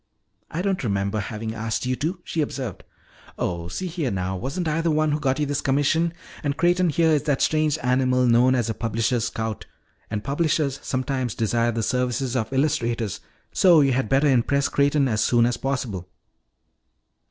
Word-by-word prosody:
"I 170 Hz, +3 st, -3 dB
don't 195 Hz, -5 st, -1 dB
remember 100 Hz, -1 st, -1 dB
having 110 Hz, +2 st, -4 dB
asked 115 Hz, +2 st, -3 dB
you 130 Hz, 0 st, 0 dB
to," 160 Hz, +8 st, -2 dB
she 160 Hz, -, -2 dB
observed. 130 Hz, -, -4 dB, 0.5 s
"Oh, 85 Hz, -1 st, -2 dB
see 140 Hz, -, -4 dB
here 165 Hz, -6 st, -2 dB
now, 95 Hz, -2 st, -2 dB
wasn't 140 Hz, -, -3 dB
I 155 Hz, +1 st, 0 dB
the 165 Hz, -, +1 dB
one 155 Hz, -1 st, +2 dB
who 150 Hz, -, 0 dB
got 135 Hz, -2 st, 0 dB
you 150 Hz, -, 0 dB
this 145 Hz, 0 st, -1 dB
commission? 145 Hz, +5 st, +1 dB, 0.3 s
And 145 Hz, -1 st, -1 dB
Creighton 175 Hz, +1 st, +3 dB
here 160 Hz, +1 st, +2 dB
is 150 Hz, -2 st, +3 dB
that 145 Hz, -4 st, +1 dB
strange 155 Hz, -1 st, +2 dB
animal 125 Hz, 0 st, +2 dB
known 125 Hz, +2 st, +4 dB
as 120 Hz, -3 st, 0 dB
a 110 Hz, -, -1 dB
publisher's 115 Hz, +1 st, -1 dB
scout. 110 Hz, -2 st, -4 dB, 0.4 s
And 105 Hz, -1 st, -3 dB
publishers 145 Hz, -2 st, 0 dB
sometimes 130 Hz, -2 st, -2 dB
desire 115 Hz, +1 st, +1 dB
the 115 Hz, -1 st, -2 dB
services 125 Hz, +1 st, -1 dB
of 115 Hz, -1 st, -1 dB
illustrators, 120 Hz, -, 0 dB, 0.3 s
so 175 Hz, -5 st, +6 dB
you 135 Hz, -1 st, +3 dB
had 125 Hz, -4 st, 0 dB
better 135 Hz, +2 st, +3 dB
impress 140 Hz, +2 st, +2 dB
Creighton 140 Hz, 0 st, +2 dB
as 110 Hz, -3 st, +1 dB
soon 120 Hz, -1 st, +3 dB
as 120 Hz, 0 st, 0 dB
possible. 115 Hz, -10 st, -3 dB
130 Hz, 180 wpm, -24 LUFS, 115-150 Hz, 0.5 s, so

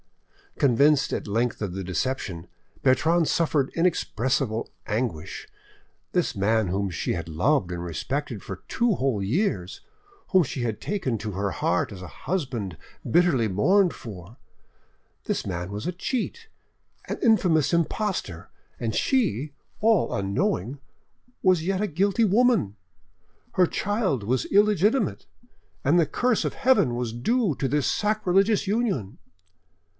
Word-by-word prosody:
Convinced 140 Hz, +2 st, +3 dB
at -, -, -3 dB
length 115 Hz, +3 st, -1 dB
of 100 Hz, -4 st, -3 dB
the 95 Hz, +1 st, -4 dB
deception, 95 Hz, -2 st, -3 dB, 0.4 s
Bertrande 160 Hz, +5 st, +3 dB
suffered 150 Hz, -5 st, +1 dB
inexpressible 130 Hz, -8 st, 0 dB, 0.2 s
anguish. 105 Hz, -8 st, -3 dB, 0.6 s
This -, -, 0 dB
man 110 Hz, +1 st, +2 dB
whom 95 Hz, +2 st, -1 dB
she 85 Hz, -, -2 dB
had 85 Hz, -1 st, -4 dB
loved 90 Hz, -, +1 dB
and 85 Hz, -1 st, -4 dB
respected 120 Hz, -, -4 dB
for 95 Hz, -2 st, -8 dB
two 235 Hz, -4 st, +1 dB
whole 125 Hz, -8 st, 0 dB
years, 100 Hz, -, -1 dB, 0.5 s
whom 185 Hz, -2 st, +5 dB
she 130 Hz, -3 st, -4 dB
had 110 Hz, -3 st, -3 dB
taken 180 Hz, -, -2 dB
to 105 Hz, 0 st, -4 dB
her 100 Hz, +1 st, -2 dB
heart 80 Hz, -, 0 dB
as 95 Hz, -, -9 dB
a 90 Hz, -, -7 dB
husband 115 Hz, -, -4 dB, 0.3 s
bitterly 165 Hz, -10 st, +3 dB
mourned 180 Hz, -, +3 dB
for—this 100 Hz, 0 st, -9 dB
man 90 Hz, 0 st, -4 dB
was 105 Hz, +7 st, -4 dB
a -, -, 0 dB
cheat, 255 Hz, -, -3 dB, 0.6 s
an -, -, -3 dB
infamous 180 Hz, -, +3 dB
impostor, 170 Hz, -, -1 dB, 0.3 s
and 115 Hz, -2 st, -2 dB
she, 155 Hz, -, 0 dB, 0.3 s
all 220 Hz, -3 st, +3 dB
unknowing, 100 Hz, +5 st, -1 dB, 0.6 s
was 180 Hz, -4 st, +3 dB
yet 190 Hz, 0 st, 0 dB
a 210 Hz, -, +1 dB
guilty 200 Hz, +6 st, +2 dB
woman! 210 Hz, -, +3 dB, 0.8 s
Her 180 Hz, -1 st, +4 dB
child 200 Hz, -, -1 dB
was 125 Hz, +5 st, 0 dB
illegitimate, 210 Hz, +3 st, +2 dB, 0.6 s
and 160 Hz, +6 st, +4 dB
the 165 Hz, -, +4 dB
curse 245 Hz, -, +1 dB
of -, -, -2 dB
Heaven 205 Hz, -, +3 dB
was 120 Hz, -2 st, -3 dB
due 190 Hz, -, +1 dB
to 135 Hz, -, -1 dB
this 145 Hz, +1 st, +1 dB
sacrilegious 210 Hz, 0 st, +2 dB
union. 200 Hz, -, -1 dB
135 Hz, 130 wpm, -25 LUFS, -, 0.8 s, whom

